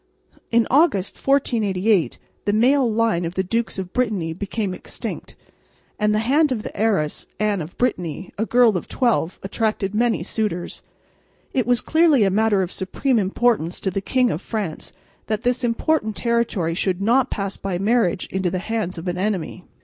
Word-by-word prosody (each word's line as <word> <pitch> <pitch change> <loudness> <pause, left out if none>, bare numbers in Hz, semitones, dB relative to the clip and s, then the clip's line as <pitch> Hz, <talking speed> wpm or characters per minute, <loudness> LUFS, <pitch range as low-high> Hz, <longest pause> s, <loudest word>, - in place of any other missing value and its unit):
In 235 -1 +3
August, 260 - +3
1488, 215 - +1 0.3
the 205 - +1
male 250 +2 +3
line 220 -5 +1
of 170 +1 -4
the 190 - +1
Dukes 230 +4 -2
of 185 -1 -5
Brittany 210 -10 0
became 200 +2 -3
extinct; - - -7 0.6
and 210 0 +2
the 210 - +2
hand 290 +3 +3
of 225 -4 -2
the - - -7
heiress, 200 -9 0
Anne 210 -3 +1
of 160 +3 -9
Brittany, 180 - -2
a 220 +2 -2
girl 235 -5 +4
of - - -6
twelve, 230 -9 0
attracted 210 -1 -1
many 230 +1 +1
suitors. 205 -6 -3 0.7
It 250 -4 0
was 245 -1 +3
clearly 315 -7 +4
a 195 - +2
matter 210 -1 +2
of 180 - -5
supreme 235 +6 0
importance 195 -3 +1
to 190 - -1
the 195 +1 -2
King 250 +4 +1
of 160 - -3
France 205 -8 -4 0.4
that 215 +1 -2
this 250 +1 0
important 235 -1 0
territory 235 -8 0
should 185 +1 -1
not 240 +6 +2
pass 195 -2 -3
by 195 -2 -3
marriage 200 -2 +1
into 190 -1 0
the 185 - -2
hands 195 -2 -3
of 165 +3 -6
an 180 0 -2
enemy. 185 -3 -2
210 Hz, 170 wpm, -22 LUFS, 185-235 Hz, 0.7 s, girl